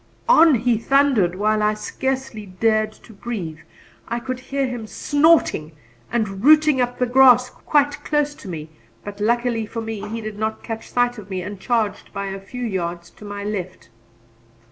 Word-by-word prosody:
On 330 - +7
he 235 -1 +1
thundered, 255 -8 +3
while 215 +2 +1
I 210 0 +2
scarcely 260 -1 -4
dared 215 +3 +1
to 220 - -17
breathe. 195 -8 -5 0.5
I 235 - -2
could 255 +1 -5
hear 275 +1 -2
him 245 -4 -5
snorting 290 - +2 0.4
and 210 -4 -2
rooting 305 -2 +6
up 245 0 -1
the 250 - +1
grass 250 0 +5
quite 290 -1 0
close 295 -1 0
to 250 - -13
me, 160 -3 -7 0.3
but 205 0 -7
luckily 235 0 0
for 230 - -5
me 220 -2 -5
he 225 +1 -4
did 215 -2 -7
not 220 0 -2
catch 225 -1 -6
sight 245 -1 +1
of 205 -1 -12
me 185 -2 -3
and 205 +1 -7
charged 225 -2 -1
by 200 0 -4
a 195 0 -5
few 245 +5 -6
yards 175 -4 -4
to 210 - -14
my 205 0 -6
left. 185 - -5
225 Hz, 175 wpm, -21 LUFS, 205-255 Hz, 0.5 s, On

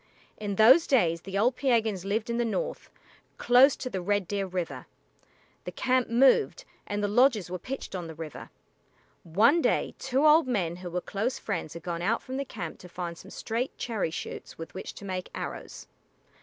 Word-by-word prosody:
In 205 -2 -3
those 255 - +7
days 170 - +3
the 195 +2 -4
old 240 +5 +3
Piegans 225 -8 +1
lived 215 +3 -1
in 235 - -1
the 240 - +2
north, - - -3 0.5
close 255 +3 +6
to - - -6
the 190 -7 -3
Red 205 0 0
Deer 200 0 -2
River. 180 -2 -4 0.8
The - - -6
camp 255 -1 +1
moved, 275 - +3 0.2
and 205 0 -2
the - - +2
lodges 215 -4 +3
were 180 - -3
pitched 265 +9 -6
on 180 -3 -4
the 160 - -9
river. 155 -2 -8 0.7
One 225 - +4
day - - +1
two 265 +3 +1
old 305 -1 +6
men 180 -9 -1
who 180 -1 -7
were 180 +1 -2
close 220 +8 -2
friends 170 -6 -4
had 170 - -8
gone 170 -1 -3
out 220 +6 0
from 260 +1 -5
the 275 - -2
camp 175 -10 -7
to 180 - -12
find 175 -1 -5
some 190 - -13
straight 235 +6 -3
cherry 220 -8 -2
shoots 160 - -7
with 165 0 -8
which 190 - -7
to 200 - -10
make 185 -1 -4
arrows. - - -6
205 Hz, 195 wpm, -28 LUFS, 180-255 Hz, 0.8 s, those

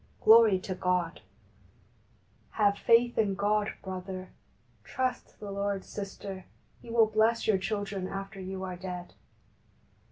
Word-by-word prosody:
Glory 220 -3 +7
to 185 +1 -5
God! 180 -2 -1 1.3
Have 205 -2 +3
faith 240 0 +4
in 200 -3 +2
God, 205 +1 +1
brother! 185 0 -6 0.5
Trust 255 -1 -3
the 205 -1 -7
Lord, 200 -1 -2
sister! 195 -2 -7 0.4
He - - -13
will 230 -1 +5
bless 220 +2 +2
your 205 -3 +3
children 200 -1 -3
after 195 +1 -6
you 190 0 -5
are 185 -1 -4
dead. 180 -1 -7
200 Hz, 125 wpm, -29 LUFS, 185-220 Hz, 1.3 s, Glory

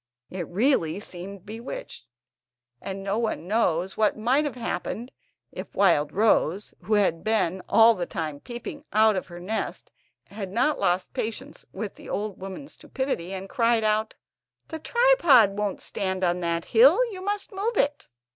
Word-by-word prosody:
It 180 -3 -4
really 200 - +1
seemed 190 0 -9
bewitched, 230 - -8 0.7
and 195 0 -5
no 200 +3 -1
one 215 -7 -2
knows 190 -4 0
what 215 0 +2
might 255 +7 +2
have 290 - -3
happened 235 +2 -4 0.4
if - - -8
Wildrose, 185 +2 +2
who 210 +4 0
had 185 -5 +1
been 190 -5 +1
all 225 +1 +7
the 180 -5 -4
time 155 -4 -4
peeping 240 - -8
out 215 0 +4
of 185 - -3
her 175 -1 -10
nest, 215 +5 -4 0.4
had 200 -2 -6
not 255 +8 +1
lost 180 -1 0
patience 255 +6 -5
at 215 -3 -4
the - - -13
old 205 -2 -3
woman's 195 +9 -8
stupidity, 260 -10 -4
and 195 0 -5
cried 230 -1 +2
out: 215 0 +1 0.5
"The 320 - -5
tripod 410 - +5
won't 205 -1 -2
stand 190 -2 -3
on 175 0 +1
that 170 -1 -1
hill, 475 +3 +6
you 370 -2 -7
must 410 +3 -3
move 410 +3 -2
it!" 290 0 0
210 Hz, 155 wpm, -25 LUFS, 185-245 Hz, 0.7 s, all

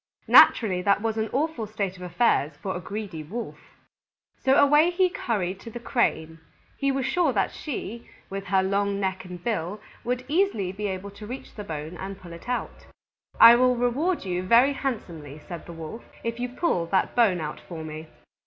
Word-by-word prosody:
Naturally 190 -6 +6
that 200 +2 +2
was 225 -1 0
an 220 0 -1
awful 280 -5 -1
state 200 -3 -3
of 180 - -13
affairs 175 - +1
for 190 +5 -4
a - - -3
greedy 195 -3 -6
Wolf. 220 +10 -6 0.8
So 265 0 +4
away 295 +4 +6
he 365 +1 +2
hurried 195 - -2
to 230 - -9
the 240 - -7
Crane. 160 -10 -1 0.4
He 275 -1 0
was 270 -1 -1
sure 345 0 +2
that 195 -3 +1
she, 235 -5 -6 0.2
with 195 0 -6
her 190 -1 +2
long 200 +1 0
neck 190 -1 -2
and 180 -1 -9
bill, 205 -2 -2 0.2
would 250 +1 -2
easily 295 - +1
be 205 +2 -4
able 190 +1 -5
to 210 +1 -10
reach 255 +4 -8
the 210 - -7
bone 160 -1 -6
and 195 +1 -7
pull 175 -2 -11
it 170 +8 -11
out. 250 - -4 0.5
"I 230 +1 +11
will 250 +1 +4
reward 250 - 0
you 180 -1 -1
very 235 +9 +5
handsomely," 170 - -5
said 175 -2 -8
the 170 - -8
Wolf, 165 +7 -8 0.2
"if 230 +1 -3
you 245 0 -2
pull 245 - 0
that 190 - 0
bone 215 -7 +4
out 150 -1 -5
for 165 -3 -8
me." 155 0 -7
205 Hz, 190 wpm, -26 LUFS, 180-245 Hz, 0.8 s, I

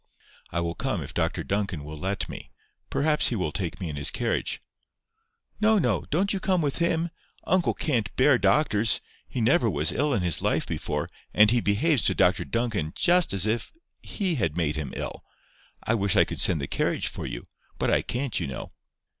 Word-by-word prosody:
"I 85 - -1
will 85 0 -2
come 110 - -2
if 65 - -9
Dr - - -1
Duncan 100 -6 -2
will 75 +1 -8
let 95 +4 -2
me. - - -9 0.4
Perhaps 150 +1 +2
he 120 - -2
will 90 -7 -1
take 90 -2 -4
me 90 - -4
in 75 -2 -5
his 70 - +3
carriage." - - -1 1.0
"No, 220 0 +4
no. 185 - +1
Don't 190 +7 +1
you 195 - -1
come 185 -1 +1
with 145 -2 -1
him. 170 0 +1 0.3
Uncle 185 -2 +2
can't 115 -8 0
bear 130 -1 +4
doctors. 110 -7 +3 0.3
He 125 - -4
never 115 0 +3
was 75 -4 +2
ill 145 -1 +1
in 95 - 0
his 85 -4 0
life - - +1
before, - - -3 0.3
and 105 0 +7
he 120 0 +3
behaves 120 +6 +2
to - - +4
Dr 90 0 +2
Duncan 110 -10 -2
just 175 0 +3
as 100 -1 0
if 110 +1 -1 0.3
he 190 -5 -1
had 80 -8 -1
made 80 -3 0
him 75 -2 -4
ill. - - -4 0.6
I 115 - +1
wish 100 -4 +1
I - - +5
could - - -6
send 80 - +3
the 70 - -3
carriage - - 0
for - - -5
you. - - -6 0.3
But - - 0
I - - +3
can't, 130 +1 -1
you - - -2
know." 65 -2 -6
110 Hz, 200 wpm, -26 LUFS, -, 1.0 s, and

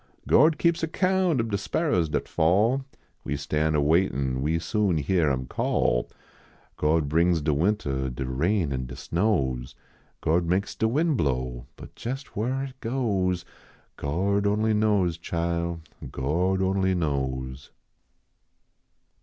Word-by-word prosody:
Gord 155 +3 +5
keeps 170 0 +2
account 185 -1 +1
ob 115 -1 -1
de 100 - +1
sparrers 100 - 0
dat - - -2
fall, 105 +11 +2 0.4
We 75 - -2
stan 75 +2 0
a 75 - +3
waitin 70 -5 +1
we 80 +4 +1
soon 95 +1 0
hyar 80 +1 +2
him 65 -1 -2
call. - - 0 0.7
Gord 75 0 +1
brings 85 +3 +3
de 75 0 0
wintah, 70 -6 0
De 65 +1 -4
rain 80 +6 0
an 65 -1 -3
de 60 - -8
snows, 70 - -1 0.4
Gord 85 +2 +1
makes 95 +3 0
de 110 - 0
win 155 +7 +1
blow, 65 - -2
But - - -12
jes 135 +4 -3
whar 130 +6 -1
it 130 -1 -8
goes, 100 -8 -1 0.5
Gord 100 +8 0
only 110 +2 +2
knows, 100 -6 +2
chile, 85 0 -2 0.3
Gord 90 +8 0
onlv 95 -1 +1
knows. 65 -4 -3
85 Hz, 135 wpm, -26 LUFS, 70-105 Hz, 0.7 s, Gord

